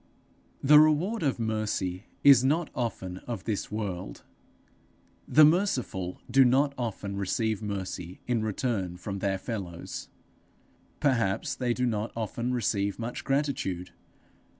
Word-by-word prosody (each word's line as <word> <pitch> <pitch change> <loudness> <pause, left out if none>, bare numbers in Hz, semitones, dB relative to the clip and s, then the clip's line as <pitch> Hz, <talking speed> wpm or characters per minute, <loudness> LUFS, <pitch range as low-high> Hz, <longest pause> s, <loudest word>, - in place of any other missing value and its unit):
The 150 +2 +8
reward 155 +9 +3
of 140 -5 +1
mercy 110 -4 -2 0.2
is 140 -3 +8
not 155 +5 +1
often 95 -7 -3
of 120 -2 -4
this 110 -2 -3
world; 95 - -4 1.0
the 155 0 +7
merciful 135 - 0
do 135 0 +7
not 135 +3 +3
often 105 -5 -4
receive 110 +2 -1
mercy 95 -4 -5
in 120 -2 0
return 105 -4 -2
from 95 +2 -5
their 95 0 0
fellows; 95 -5 -6 0.9
perhaps 120 -2 +1
they 125 -3 -1
do 125 - 0
not 110 -2 -1
often 115 +2 -2
receive 100 -5 0
much 115 +1 -5
gratitude. 135 -11 -1
115 Hz, 125 wpm, -28 LUFS, 100-135 Hz, 1.0 s, The